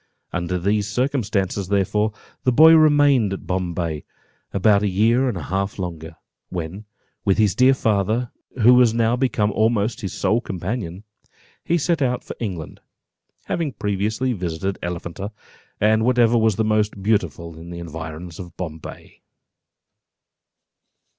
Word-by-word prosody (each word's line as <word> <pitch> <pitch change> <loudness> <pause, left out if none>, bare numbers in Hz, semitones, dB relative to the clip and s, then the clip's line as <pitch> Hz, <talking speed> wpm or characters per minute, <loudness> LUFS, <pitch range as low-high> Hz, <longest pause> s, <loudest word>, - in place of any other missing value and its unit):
Under 85 +1 -1
these 100 +3 0
circumstances, 105 -6 -1
therefore, 100 +2 +1 0.3
the 130 - +3
boy 160 +6 +8
remained 145 -9 +5
at 95 - -7
Bombay 85 -4 -2 0.5
about 100 +1 +3
a 105 - +1
year 115 +7 +2
and 110 - -3
a 85 - -5
half 95 +5 -2
longer, 85 -3 -6 0.3
when, 90 +4 -5 0.4
with 100 -2 +2
his 105 -3 +3
dear 130 +1 +5
father, 110 +1 0 0.3
who 120 +3 +8
was 125 -2 +5
now 115 0 +2
become 120 -5 +1
almost 110 0 +1
his 95 - -4
sole 115 +2 +1
companion, 95 -1 -5 0.6
he 170 - +1
set 170 0 0
out 125 -2 0
for - - -8
England, 90 -9 -5 0.7
having 160 -6 -2
previously 105 +5 -1
visited 90 0 -3
Elephanta, 85 +3 -5 0.5
and 110 +1 +3
whatever 120 -1 +3
was 110 -3 +2
most 105 -2 0
beautiful 85 -6 -1
in 85 +1 -10
the 85 - -7
environs 80 0 -7
of 90 -2 -10
Bombay. 80 -3 -8
105 Hz, 135 wpm, -22 LUFS, 90-120 Hz, 0.7 s, boy